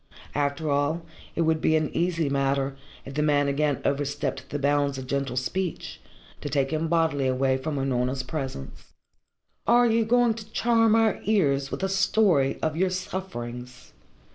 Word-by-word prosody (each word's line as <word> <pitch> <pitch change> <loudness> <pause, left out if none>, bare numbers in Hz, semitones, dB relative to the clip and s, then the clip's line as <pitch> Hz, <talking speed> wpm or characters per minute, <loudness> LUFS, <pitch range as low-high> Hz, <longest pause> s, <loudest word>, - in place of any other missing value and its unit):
After 145 +2 -1
all, 145 +4 0 0.3
it - - 0
would 160 -1 +2
be 160 - +3
an 155 -1 -1
easy 170 -2 +1
matter, 140 0 0 0.3
if 135 - -8
the 150 - 0
man 145 -1 +2
again 145 0 0
overstepped 140 -1 -2
the 145 - -2
bounds 140 -1 +1
of 130 - -6
gentle 135 -1 -2
speech, 180 +8 -3 0.4
to 145 - -4
take 135 -1 0
him 160 +1 0
bodily 160 -5 +1
away 130 +1 +1
from 145 +3 -3
Unorna's 130 -1 -1
presence. 70 - -6 0.7
"And 235 - +5
are 245 - +5
you 230 -1 +3
going 240 +1 +3
to 220 -1 -10
charm 225 -2 +3
our 225 -1 +2
ears 140 -10 +2
with - - -5
a - - +2
story 195 -7 +2
of 155 -1 0
your 185 +3 +2
sufferings?" 125 -10 -6
145 Hz, 165 wpm, -26 LUFS, 135-180 Hz, 0.7 s, And